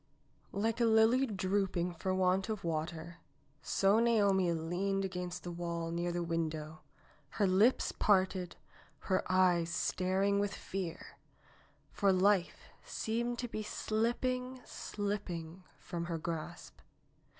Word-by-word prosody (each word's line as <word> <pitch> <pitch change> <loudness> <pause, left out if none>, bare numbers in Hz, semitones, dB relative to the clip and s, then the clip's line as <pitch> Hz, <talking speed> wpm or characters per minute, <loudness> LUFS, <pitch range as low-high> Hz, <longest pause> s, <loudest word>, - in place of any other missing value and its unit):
Like 225 +4 0
a - - +5
lily 225 +4 +4
drooping 190 -3 0
for 180 +3 -3
want 185 +2 +2
of 215 -2 -3
water, 165 +1 -3 0.4
so 195 +7 +3
Naomi 200 -6 +3
leaned 180 +4 -1
against 180 -1 -5
the 175 - -5
wall 170 -1 -3
near 175 +1 -1
the 175 0 -2
window, 160 -2 -3 0.6
her 205 - +3
lips 200 +7 +3
parted, 185 -3 +1 0.6
her 185 - +3
eyes 180 -2 +3
staring 190 +3 +1
with 200 0 -1
fear, 185 -3 -6 0.7
for 200 -2 +2
life 190 -1 +2
seemed 235 +2 -2
to 245 - -3
be 215 -2 -4
slipping, 250 +4 -1
slipping 185 -4 -4
from 170 -1 -5
her 170 -1 -2
grasp. 160 -1 -6
185 Hz, 120 wpm, -33 LUFS, 170-210 Hz, 0.7 s, a